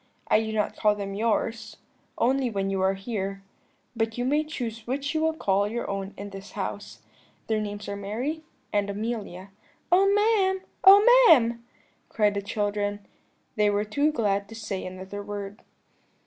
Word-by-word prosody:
I 215 Hz, -, +4 dB
do 220 Hz, 0 st, -3 dB
not 215 Hz, -1 st, -1 dB
call 210 Hz, -1 st, +2 dB
them 200 Hz, -1 st, -5 dB
yours, 220 Hz, +1 st, -1 dB, 0.4 s
only 260 Hz, +1 st, +2 dB
when 195 Hz, -3 st, -2 dB
you 195 Hz, -1 st, -1 dB
are 190 Hz, +1 st, +2 dB
here; 195 Hz, -1 st, -4 dB, 0.5 s
but 225 Hz, 0 st, -1 dB
you 245 Hz, -, -1 dB
may 295 Hz, +4 st, +2 dB
choose 235 Hz, -7 st, -6 dB
which 280 Hz, +4 st, -2 dB
you 315 Hz, -, 0 dB
will 320 Hz, 0 st, +1 dB
call 200 Hz, -7 st, +1 dB
your 235 Hz, +3 st, -4 dB
own 195 Hz, 0 st, -4 dB
in 200 Hz, +1 st, -7 dB
this 195 Hz, +1 st, -10 dB
house. -, -, -6 dB, 0.4 s
Their 220 Hz, -1 st, 0 dB
names 205 Hz, 0 st, -5 dB
are 200 Hz, -, -3 dB
Mary 235 Hz, +11 st, -3 dB, 0.3 s
and 205 Hz, -1 st, +1 dB
Amelia.' 200 Hz, -3 st, -5 dB, 0.4 s
"'Oh, 390 Hz, +2 st, +5 dB
ma'am! 400 Hz, -3 st, +2 dB, 0.2 s
Oh, 400 Hz, +2 st, +9 dB, 0.2 s
ma'am!' 235 Hz, -5 st, +5 dB, 0.5 s
cried 210 Hz, -2 st, +2 dB
the 200 Hz, -, -2 dB
children; 205 Hz, 0 st, -2 dB, 0.5 s
they 210 Hz, -1 st, +4 dB
were 205 Hz, +1 st, 0 dB
too 285 Hz, +8 st, +1 dB
glad 200 Hz, -7 st, 0 dB
to 225 Hz, -, -9 dB
say 215 Hz, -4 st, -4 dB
another 190 Hz, +2 st, -7 dB
word. 205 Hz, 0 st, -7 dB
210 Hz, 165 wpm, -26 LUFS, 200-245 Hz, 0.5 s, Oh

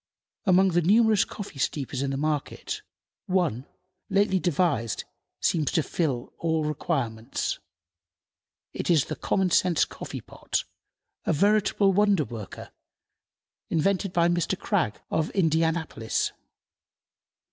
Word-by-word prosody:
Among 190 Hz, 0 st, +5 dB
the 175 Hz, -1 st, +2 dB
numerous 215 Hz, +3 st, +5 dB
coffee 195 Hz, -9 st, -8 dB
steepers 135 Hz, 0 st, -1 dB
in 140 Hz, -, 0 dB
the 135 Hz, -, -2 dB
market, 150 Hz, 0 st, -2 dB, 0.5 s
one, 165 Hz, -, 0 dB, 0.4 s
lately 195 Hz, -1 st, +3 dB
devised, 165 Hz, -, 0 dB, 0.4 s
seems 155 Hz, -4 st, +1 dB
to 160 Hz, -, +3 dB
fill 140 Hz, -8 st, -2 dB
all 160 Hz, -1 st, +1 dB
requirements. 135 Hz, -7 st, -2 dB, 1.1 s
It -, -, -4 dB
is 160 Hz, -6 st, +4 dB
the -, -, -4 dB
Common 190 Hz, -2 st, 0 dB
sense 175 Hz, -2 st, +3 dB
Coffee -, -, -7 dB
pot, -, -, -3 dB, 0.6 s
a -, -, +2 dB
veritable 200 Hz, +2 st, +3 dB
wonder 200 Hz, -5 st, +3 dB
worker, 110 Hz, -5 st, -8 dB, 1.0 s
invented 190 Hz, +4 st, +1 dB
by 170 Hz, -2 st, +3 dB
Mr. 175 Hz, +2 st, 0 dB
Krag, 185 Hz, -, 0 dB
of 160 Hz, -1 st, +1 dB
Indianapolis. 160 Hz, -, +1 dB
165 Hz, 115 wpm, -26 LUFS, 145-190 Hz, 1.1 s, Among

